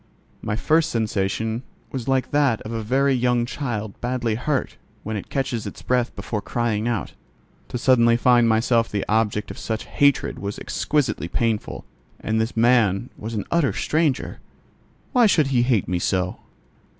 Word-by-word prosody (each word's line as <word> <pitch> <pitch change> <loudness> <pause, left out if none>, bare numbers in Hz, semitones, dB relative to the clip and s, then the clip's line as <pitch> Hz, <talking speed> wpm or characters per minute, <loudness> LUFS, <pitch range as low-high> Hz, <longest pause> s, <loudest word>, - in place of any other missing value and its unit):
My 105 - -2
first 155 +8 +2
sensation 110 +1 -1 0.3
was 130 -2 -5
like 135 -1 +1
that 140 -6 +2
of 110 - -7
a 115 -1 -2
very 135 +5 +2
young 125 -1 +2
child 115 -6 -4
badly 120 -2 -1
hurt, 130 +4 -1 0.3
when 110 +1 -4
it 100 - -6
catches 130 -5 -2
its - - -9
breath 125 -1 0
before 105 -3 -4
crying 115 0 -1
out. 115 -5 -2 0.5
To - - -4
suddenly 120 -2 +4
find 120 -1 +4
myself 115 +1 +2
the 100 -2 -2
object 105 -1 0
of - - -9
such 110 -1 -3
hatred 140 -1 +2
was 100 +1 -4
exquisitely 140 - -1
painful: 115 +3 -2 0.3
and 110 0 0
this 115 +1 -3
man 115 -2 +3
was 110 +2 -6
an 105 - -2
utter 165 -5 +2
stranger. 155 -4 0 0.7
Why 245 -4 +5
should 155 -8 +3
he 120 - +4
hate 120 -5 +2
me 90 -1 -1
so? 90 0 -1
115 Hz, 160 wpm, -23 LUFS, 110-130 Hz, 0.7 s, Why